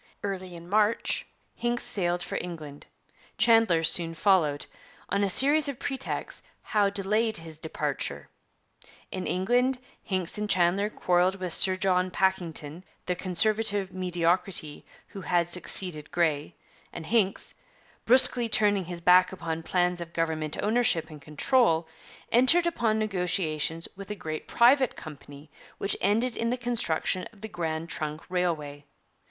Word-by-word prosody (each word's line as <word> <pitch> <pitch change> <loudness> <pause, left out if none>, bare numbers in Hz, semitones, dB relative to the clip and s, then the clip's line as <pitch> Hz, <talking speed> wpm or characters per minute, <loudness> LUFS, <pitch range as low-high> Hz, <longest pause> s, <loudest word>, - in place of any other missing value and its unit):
Early 185 -3 -4
in 170 0 -11
March 210 +3 +1 0.3
Hincks 240 0 -1
sailed 180 -7 +1
for - - -6
England; 155 -5 -9 0.5
Chandler 225 -8 +4
soon 165 0 +1
followed; 160 -6 +2 0.4
on 200 +2 +1
a 200 - +2
series 285 +8 +4
of 275 - -5
pretexts 265 0 -4 0.2
Howe 205 -2 +2
delayed 210 +3 +1
his 160 -1 -8
departure. 160 -1 -3 0.8
In 185 - -4
England, 245 +8 +1 0.2
Hincks 185 0 -3
and 210 0 -3
Chandler 185 +3 +2
quarrelled 180 -2 +1
with 185 -3 -4
Sir 185 0 +3
John 185 -1 +1
Pakington, 175 -4 -1 0.2
the 180 - -1
Conservative 200 +2 0
mediocrity 175 -3 0 0.2
who 195 - -9
had 175 -2 +1
succeeded 175 -2 -2
Grey, 155 -4 -1 0.4
and 165 - -8
Hincks, 200 -1 +1 0.5
brusquely 250 -1 +5
turning 205 -3 +2
his 175 0 -5
back 180 +1 +5
upon 165 -3 -4
plans 180 +1 0
of 170 0 -8
government 160 -2 -2
ownership 210 -8 +1
and 150 -2 -11
control, 165 - +1 0.4
entered 260 +9 +4
upon 235 -10 0
negotiations 180 -6 -1
with 195 0 -10
a 210 - -4
great 155 -5 -6
private 255 +1 +4
company 145 -1 -11 0.3
which 200 - -1
ended 225 +5 +2
in 230 - -1
the 250 - -1
construction 220 -7 -1
of 210 -3 -21
the 220 - -5
Grand 165 -4 -4
Trunk 155 -1 -4
Railway. 155 -6 -2
185 Hz, 135 wpm, -27 LUFS, 165-215 Hz, 0.8 s, brusquely